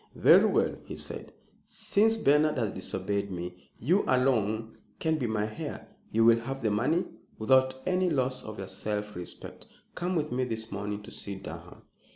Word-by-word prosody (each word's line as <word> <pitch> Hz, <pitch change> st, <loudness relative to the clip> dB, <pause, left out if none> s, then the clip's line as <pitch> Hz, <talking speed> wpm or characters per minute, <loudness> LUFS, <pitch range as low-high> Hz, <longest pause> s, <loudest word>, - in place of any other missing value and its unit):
"Very -, -, +7 dB
well," -, -, +2 dB
he -, -, -7 dB
said, -, -, -5 dB, 0.3 s
"since 220 Hz, +2 st, +2 dB
Bernard 150 Hz, -5 st, +3 dB
has 110 Hz, -5 st, 0 dB
disobeyed 100 Hz, +2 st, -2 dB
me, 90 Hz, 0 st, -7 dB
you 175 Hz, -, +3 dB
alone 115 Hz, -4 st, +1 dB, 0.2 s
can 160 Hz, -1 st, 0 dB
be 125 Hz, -, 0 dB
my 110 Hz, -1 st, -1 dB
heir. -, -, -6 dB, 0.2 s
You 115 Hz, +1 st, +4 dB
will 115 Hz, 0 st, +6 dB
have 135 Hz, +3 st, -5 dB
the 110 Hz, -, +2 dB
money 140 Hz, -, +2 dB, 0.3 s
without 130 Hz, +3 st, +4 dB
any 185 Hz, 0 st, +2 dB
loss 130 Hz, -4 st, 0 dB
of 110 Hz, -1 st, -8 dB
your 95 Hz, -, -5 dB
self 105 Hz, +1 st, -4 dB
respect. 90 Hz, 0 st, -8 dB, 0.3 s
Come 180 Hz, +1 st, -2 dB
with 155 Hz, -2 st, -1 dB
me 130 Hz, +1 st, 0 dB
this 110 Hz, -2 st, -4 dB
morning 105 Hz, +1 st, -4 dB
to -, -, -11 dB
see 100 Hz, -, -5 dB
Durham." 95 Hz, -, -9 dB
115 Hz, 175 wpm, -29 LUFS, 105-140 Hz, 0.3 s, Very